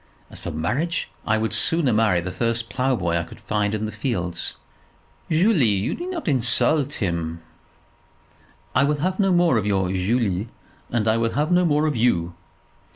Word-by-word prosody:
As - - -8
for - - -5
marriage, 135 - -2 0.2
I 110 0 +3
would 110 0 -1
sooner 165 -7 +3
marry 105 -5 +3
the 90 +1 -5
first 115 +4 -1
ploughboy 125 -11 0
I - - -2
could 85 - -12
find 105 -1 -1
in 110 0 -2
the 110 - -4
fields." 90 - -3 0.7
"Julie, 165 - +3
you 100 -1 0
need 350 - -5
not 350 -4 -5
insult 135 +2 +2
him." 85 -4 -3 1.3
"I 130 - +4
will 145 0 0
have 185 +3 -1
no 195 -2 +3
more 175 -7 +3
of 105 - -3
your 95 -2 +1
Julie; 100 +1 0 0.4
and 115 -2 -1
I 110 +1 +3
will 115 0 0
have 150 +4 0
no 180 0 +4
more 150 -1 +2
of 150 -3 0
you." 90 -8 +1
115 Hz, 175 wpm, -23 LUFS, 95-150 Hz, 1.3 s, I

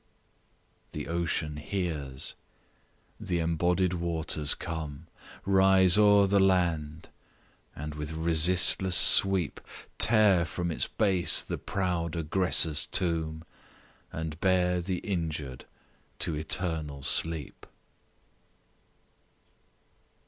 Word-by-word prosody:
The - - -6
Ocean 80 -2 -3
hears 75 -6 -5 0.9
The 90 - -3
embodied 85 +2 -1
waters 80 -3 0
come 80 -2 -7 0.4
Rise 95 -2 +5
o'er 105 -1 +4
the 100 +1 +1
land, 85 -5 -1 0.7
and 75 +1 -7
with 75 +1 -7
resistless 85 +3 +3
sweep 95 -5 +4 0.4
Tear 105 -5 +4
from 85 +2 -4
its - - -2
base 95 -5 +1
the - - -6
proud 90 -3 -3
aggressor's 80 -1 +1
tomb, 80 -3 0 0.7
And 80 -1 -6
bear 90 -1 +1
the 90 +1 -3
injured 80 - -5 0.5
to 85 - -2
eternal 75 -2 -3
sleep. 80 0 -1
85 Hz, 90 wpm, -27 LUFS, 80-95 Hz, 0.9 s, Rise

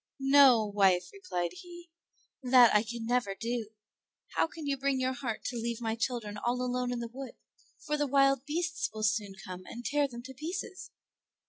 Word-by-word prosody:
"No, 260 -6 +7
wife," 195 -3 +2
replied 180 - -3
he, 345 - -12 0.5
"that 250 -2 +6
I 210 - +5
can 230 +1 -6
never 240 -4 0
do; 230 +1 -3 0.7
how - - +2
can 320 -1 -9
you 280 -1 0
bring 275 0 0
your 260 0 0
heart 245 -4 -4
to 245 - -3
leave 235 0 -3
my 225 -2 -1
children 225 -3 -3
all 240 +3 -1
alone 250 0 -1
in 240 -1 -3
the 235 - -4
wood, 270 -1 -7 0.5
for 300 -1 0
the 290 -1 0
wild 275 -1 +3
beasts 345 +3 -1
will 215 - -6
soon 205 -1 0
come 185 0 -7
and 240 +1 -8
tear 290 +5 +2
them 240 -2 -9
to 265 +1 -9
pieces?" 365 - -6
245 Hz, 190 wpm, -30 LUFS, 225-280 Hz, 0.7 s, No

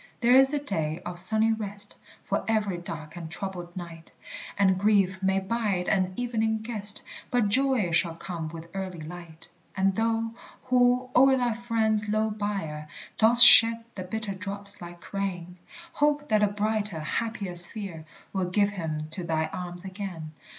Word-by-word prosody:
There 240 +1 +3
is 270 +1 +6
a 295 - -1
day 165 - -3
of 175 0 -2
sunny 220 +4 +7
rest 205 -2 -5 0.3
For - - -2
every 210 -5 -1
dark 155 -2 -9
and 170 -2 -8
troubled 180 -1 -6
night; 165 -2 -10 0.5
And 190 -2 +2
grief 195 -2 +1
may 190 0 +1
bide 195 -2 -2
an 185 -2 0
evening 220 -2 -2
guest, 210 -3 0 0.3
But 240 -4 +1
joy 255 -5 +1
shall 165 0 0
come 165 -1 -6
with 165 +1 -10
early 190 -3 -6
light. 165 0 -11 0.3
And 195 0 +1
thou, 225 +2 -1 0.3
who 250 0 +1
o'er 265 +1 +5
thy 245 -2 0
friend's 220 -2 -1
low 215 +1 0
bier 195 -8 -5 0.3
Dost 235 +2 +9
shed 230 -1 +8
the 190 - -7
bitter 210 +2 -4
drops 200 +1 +2
like 175 +2 -12
rain, 180 -3 -5 0.4
Hope 295 0 0
that 215 -1 +2
a 210 - +4
brighter, 210 -3 -2
happier 205 +3 -4
sphere 175 -1 +2 0.3
Will 190 -2 -1
give 200 +2 +1
him 155 -5 -5
to 180 +2 -6
thy 160 -1 -2
arms 180 0 -7
again. 185 -5 -7
200 Hz, 160 wpm, -26 LUFS, 175-220 Hz, 0.5 s, Dost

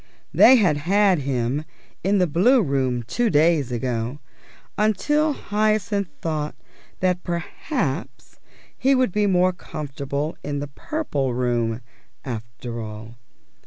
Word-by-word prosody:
They 260 - +8
had 180 - +3
had 190 +3 +3
him 135 +1 -1 0.4
in 200 +2 +2
the 185 - +4
Blue 200 - +4
Room 130 -4 0
two 235 - 0
days 150 - +3
ago, 120 +1 -2 0.6
until 295 +9 +2
Hyacinth 210 -3 0 0.2
thought 155 -2 -2 0.5
that 180 -1 +1
perhaps 170 0 -4 0.4
he 270 +1 +3
would 255 -5 +2
be 210 +2 +1
more 185 -1 +3
comfortable 145 -2 -4
in 145 0 -3
the 145 +1 -3
Purple 140 - -2
Room, 120 -2 0 0.4
after 115 -1 -6
all. 110 +1 -8
155 Hz, 120 wpm, -23 LUFS, 125-205 Hz, 0.6 s, They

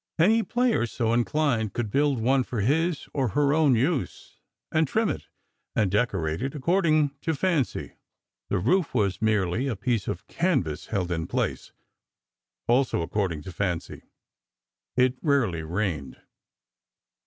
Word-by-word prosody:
Any 215 +8 +4
player 240 - +1
so 115 -1 -1
inclined 120 -3 +1
could 115 -4 -3
build 140 -1 +2
one 130 +3 +3
for 120 -3 -3
his 160 - +1
or 135 -3 +1
her 145 -1 +3
own 150 -5 +4
use, 130 - -2 0.3
and 160 -1 +2
trim 220 +8 +1
it - - -4 0.5
and 100 -4 +2
decorate 95 -7 0
it 135 +3 -3
according 155 -1 +2
to 160 - -1
fancy. 155 - -1 0.5
The - - +1
roof 150 - +1
was 100 -4 +1
merely 110 +2 +1
a 125 - -1
piece 110 0 -1
of - - -4
canvas, 95 - -1
held 90 -5 -2
in 80 -1 -2
place—also 125 +6 -3
according 90 -3 -2
to 95 - -7
fancy. 90 -3 -3 1.0
It 130 0 +3
rarely 125 - +1
rained. 80 -5 -3
125 Hz, 135 wpm, -26 LUFS, 100-150 Hz, 1.0 s, Any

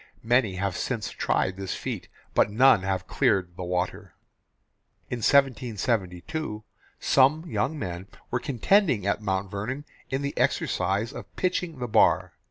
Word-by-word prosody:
Many 115 -4 +2
have 95 -1 -2
since 115 -5 -2
tried 95 0 0
this 95 -1 -4
feat, - - -5 0.3
but - - +4
none 120 -1 +5
have 95 -1 -2
cleared 90 -3 +1
the - - -7
water. 90 0 -3 1.0
In 125 - -2
1772 115 - 0 0.4
some 140 +5 +4
young 160 -2 -1
men 90 -5 -5 0.2
were 125 - +1
contending 140 - +2
at 100 +1 0
Mount 95 -1 -2
Vernon 125 +9 -4 0.2
in 135 +1 -2
the 140 - -3
exercise 100 +7 0
of - - -10
pitching 180 -4 -1
the 125 -1 -3
bar. 110 - +3
110 Hz, 140 wpm, -26 LUFS, 95-135 Hz, 1.0 s, none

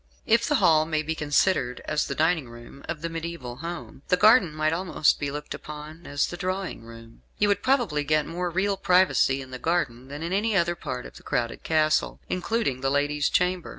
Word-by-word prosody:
If 230 +1 +3
the 295 - +2
hall 155 - +4
may 155 -1 0
be 160 +1 -2
considered 145 -3 +1
as 155 -1 0
the - - -3
dining 160 -4 +1
room 120 +4 -12
of 155 - -4
the - - 0
mediaeval 165 -7 -6
home, 170 -1 -7
the 180 - +3
garden 215 -4 +6
might 155 +1 0
almost 170 -3 +1
be 145 - -2
looked 150 +1 -6
upon 150 +2 -9
as 145 0 +1
the 175 - -6
drawing 185 -7 -3
room. 115 0 -13 0.2
You 205 - +2
would 200 0 +1
probably 235 - +1
get 150 +1 +1
more 175 +2 -3
real 195 +3 0
privacy 180 -8 +3
in 130 - -14
the 130 - -6
garden 135 -7 -1
than 145 +3 -7
in 170 +2 -3
any 210 +2 +1
other 170 -1 +2
part 125 -7 -6
of - - -11
the - - -14
crowded 115 -1 -2
castle, 155 -1 +1
including 185 - -1
the 135 - +1
lady's 145 +1 +1
chamber. 180 -1 0
160 Hz, 210 wpm, -26 LUFS, 145-180 Hz, 0.2 s, garden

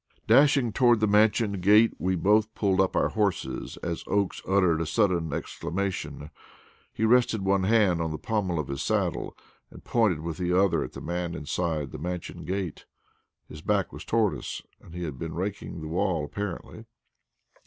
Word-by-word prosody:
Dashing 130 -1 +4
toward 120 -2 +4
the 110 - +3
Mansion 105 0 +3
gate, 105 +4 +5
we 95 +1 0
both 105 +4 +2
pulled 95 -2 +2
up 95 - 0
our - - +2
horses 105 -4 -2
as 85 -1 -3
Oakes 100 -2 0
uttered 90 -4 +3
a - - -1
sudden 85 -2 +1
exclamation. 85 -2 -4 0.6
He 110 - -1
rested 115 -3 +3
one 95 -1 +2
hand 100 -5 +3
on 80 - -1
the 80 - -4
pommel 100 -5 -1
of 75 -4 -2
his 70 -1 -4
saddle - - -1 0.3
and - - -14
pointed 105 -10 +1
with 80 -1 -5
the 90 0 +1
other 100 -1 +2
at - - -8
a - - -7
man 85 0 -3
inside 75 -2 -2
the - - -7
Mansion 90 +2 -5
gate. 95 -3 -4 0.6
His 75 - -10
back - - 0
was - - -8
toward 110 -3 +1
us, - - -6 0.2
and 85 - -14
he 90 - -4
had 75 -6 -5
been 80 -1 -5
raking 95 -2 -4
the 80 - -6
walk 85 -3 -1
apparently. 100 -4 -6
95 Hz, 175 wpm, -27 LUFS, 85-105 Hz, 0.6 s, gate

